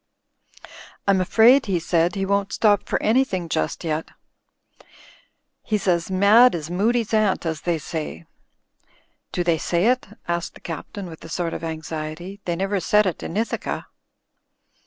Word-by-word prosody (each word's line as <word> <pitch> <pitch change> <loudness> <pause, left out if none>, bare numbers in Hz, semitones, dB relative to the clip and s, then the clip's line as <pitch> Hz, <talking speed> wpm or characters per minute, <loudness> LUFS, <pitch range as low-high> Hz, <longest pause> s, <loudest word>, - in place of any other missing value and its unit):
"I'm 195 -2 +4
afraid," 230 +7 +5
he 190 -3 +1
said, 170 +2 +1
"he 195 -1 -1
won't 200 +1 0
stop 205 -3 +2
for - - +1
anything 215 -7 +1
just 80 - -2
yet. 160 -1 -2 1.5
He's 210 -2 -2
as 170 -1 +1
mad 205 +6 +6
as 160 0 -5
Moody's 225 +5 +1
aunt, 215 -5 +2
as 160 -2 -2
they 170 -2 0
say." 150 - -6 1.1
"Do 175 - -1
they 170 -2 +1
say 175 +4 0
it?" 255 -2 0 0.2
asked 170 0 -2
the - - -12
Captain, 185 +4 -7
with 165 -3 -10
a 165 - -10
sort 165 0 -2
of - - -6
anxiety. 160 +4 -6
"They 175 - -1
never 195 +2 -1
said 210 +4 +3
it 185 - -2
in 180 - -5
Ithaca." 225 +1 -2
185 Hz, 155 wpm, -23 LUFS, 165-205 Hz, 1.5 s, mad